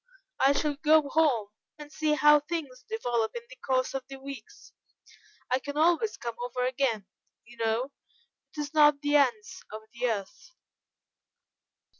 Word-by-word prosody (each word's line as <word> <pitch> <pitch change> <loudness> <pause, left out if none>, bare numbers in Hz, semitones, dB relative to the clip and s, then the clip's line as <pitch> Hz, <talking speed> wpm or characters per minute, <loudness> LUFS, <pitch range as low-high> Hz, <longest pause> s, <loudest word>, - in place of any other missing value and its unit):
I 275 +1 +5
shall 290 0 -1
go 310 0 +4
home 270 -10 +2 0.3
and 295 -1 -11
see 305 -1 +1
how 295 0 +6
things 295 -4 -5
develop 240 - -1
in 235 - -5
the - - -10
course 255 0 -1
of 270 -1 -3
the 275 - -8
weeks. 275 - -11 0.8
I 255 - +3
can 285 +2 -6
always 345 +7 +2
come 235 -1 -5
over 250 0 -2
again, 250 -5 0 0.4
you 240 +1 -16
know; 230 +4 -1 0.7
it - - -1
is 290 0 -6
not 295 -2 +5
the 290 0 +3
ends 375 +4 0
of 215 0 -8
the 245 +1 -1
earth." 220 - -6
280 Hz, 155 wpm, -28 LUFS, 245-305 Hz, 0.8 s, how